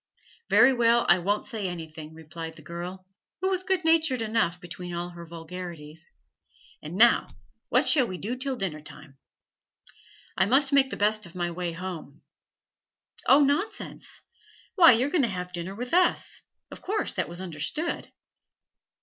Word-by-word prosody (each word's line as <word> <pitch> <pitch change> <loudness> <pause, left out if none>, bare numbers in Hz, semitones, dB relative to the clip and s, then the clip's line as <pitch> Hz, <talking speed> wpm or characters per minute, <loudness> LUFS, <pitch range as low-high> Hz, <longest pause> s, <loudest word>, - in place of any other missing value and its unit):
'Very 265 +2 +6
well, 235 -1 +3
I 175 - +6
won't 200 +4 -1
say 220 -6 -3
anything,' 160 -3 -7
replied 160 0 -8
the 155 - -14
girl, 175 +3 -7 0.3
who 375 +2 0
was 375 -1 0
good 375 -2 -1
natured 320 -7 +3
enough 215 -6 0
beneath 175 0 -7
all 175 +1 -3
her 170 -1 -10
vulgarities. 165 -1 -9 0.7
'And 155 +3 -7
now 230 +4 +5 0.4
what - - +3
shall 265 -6 +4
we 185 - -5
do 225 +7 -3
till 265 +1 -3
dinner 185 -9 -4
time?' 150 -2 -12 1.2
'I 190 - +3
must 270 +4 +3
make 270 -1 +5
the - - -5
best 210 -1 +1
of 170 - -16
my 175 -1 -2
way 175 0 -3
home.' 165 -5 -7 1.0
'Oh, 280 - +7
nonsense! 385 +10 -1 0.5
Why, 335 -8 +8
you're 255 +5 +1
going 345 - +3
to 250 - +2
have 180 -3 -5
dinner 175 +2 -5
with 245 +5 -6
us; 360 +1 +2 0.3
of - - -10
course 425 +2 -1
that - - -2
was 175 +1 -5
understood.' 185 - -4
185 Hz, 160 wpm, -27 LUFS, 170-260 Hz, 1.2 s, Why